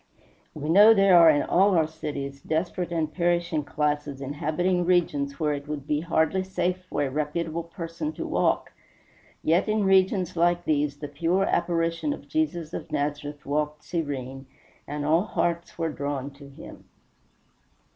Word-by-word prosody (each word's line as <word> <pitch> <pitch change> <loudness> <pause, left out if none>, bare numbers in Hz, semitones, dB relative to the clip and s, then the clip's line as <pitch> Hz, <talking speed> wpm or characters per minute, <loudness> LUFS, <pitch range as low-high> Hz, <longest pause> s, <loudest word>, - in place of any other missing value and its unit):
We 150 -1 -5
know 205 +7 +7
there 195 -2 +5
are 165 -1 +8
in 145 -2 +3
all 190 0 +3
our 160 - +4
cities 145 -3 -6
desperate 170 +2 -2
and 160 -2 -1
perishing 170 -3 0
classes 145 -1 -2
inhabiting 160 +6 -1
regions 150 -6 +1
where 150 -2 +1
it 145 0 -6
would 150 -2 -5
be 150 0 0
hardly 170 +3 +1
safe 185 -1 -2
for - - -1
a 135 - -2
reputable 155 +3 -2
person 165 -2 -5
to - - -5
walk. - - 0 0.7
Yet 170 +6 +2
in 215 -1 +1
regions 190 -2 +2
like 175 +1 +2
these 145 -1 0
the 145 0 -6
pure 165 +6 0
apparition 170 - 0
of - - -11
Jesus 175 - -2
of - - -6
Nazareth 145 0 -3
walked 150 +1 -2
serene, 135 -5 -4 0.4
and 145 0 -4
all 165 +6 +3
hearts 170 -4 -2
were 165 -1 -1
drawn 140 -1 -4
to 140 0 -14
him. 135 - -12
160 Hz, 155 wpm, -26 LUFS, 145-175 Hz, 0.7 s, are